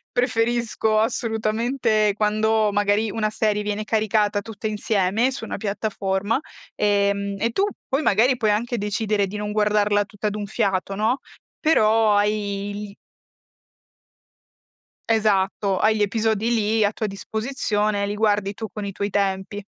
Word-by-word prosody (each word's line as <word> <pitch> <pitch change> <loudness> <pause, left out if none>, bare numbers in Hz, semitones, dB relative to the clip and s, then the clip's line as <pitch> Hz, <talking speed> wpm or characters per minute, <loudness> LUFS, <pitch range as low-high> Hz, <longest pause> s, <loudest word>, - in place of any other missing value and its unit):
preferisco 230 -3 +1
assolutamente 225 -1 +1
quando 215 0 +2
magari 205 +1 +1
una 215 +1 -1
serie 210 -1 0
viene 210 +1 -3
caricata 215 -1 +1
tutta 220 +1 -7
insieme 210 +2 +1
su 260 -3 -6
una 225 - -5
piattaforma, 200 +2 -1 0.4
ehm, 200 -1 +1
e 230 +4 0
tu 385 +12 +1 0.2
poi 270 - +1
magari 250 0 +3
puoi 220 -4 +2
anche 235 +3 -1
decidere 210 0 0
di 200 - -6
non 210 0 -3
guardarla 210 -1 +2
tutta 210 0 -3
d'un 205 0 -4
fiato, 195 -2 -1
no, 220 +6 0 0.4
però 220 -8 +4
hai 205 -1 0 0.2
il 200 - -15 2.1
Esatto, 200 -3 +1
hai 215 +3 +3
gli 210 - +1
episodi 220 +2 0
lì 220 -1 +2
a 205 - +3
tua 215 - -2
disposizione, 210 -1 -2
li 205 - -3
guardi 205 -2 +1
tu 220 - -5
con 210 -1 -5
i 200 - -3
tuoi 200 +1 -3
tempi. 195 0 -2
210 Hz, 140 wpm, -23 LUFS, 205-220 Hz, 2.1 s, però